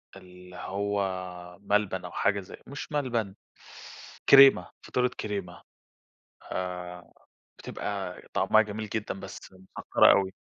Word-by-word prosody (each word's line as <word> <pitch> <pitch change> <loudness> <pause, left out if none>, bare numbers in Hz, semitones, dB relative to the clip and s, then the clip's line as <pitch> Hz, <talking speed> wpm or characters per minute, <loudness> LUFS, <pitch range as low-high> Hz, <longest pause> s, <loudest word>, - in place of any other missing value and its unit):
اللي 90 -1 -14
هو 95 -3 -4
ملبن 105 0 0
أو - - -8
حاجة 100 0 +1
زي 95 - -11
مش 140 +3 -8
ملبن 120 -9 -1 0.9
كريمة، 135 0 +8
فطيرة 125 0 +1
كريمة، 100 -5 -5 0.9
آآ 90 -1 -5 0.5
بتبقى 95 -3 -5
طعمها 110 0 +4
جميل 105 0 -6
جدًا 105 -3 -4
بس - - -10
مسكّرة 95 0 +3
أوي. 95 -1 +2
100 Hz, 110 wpm, -28 LUFS, 90-105 Hz, 0.9 s, كريمة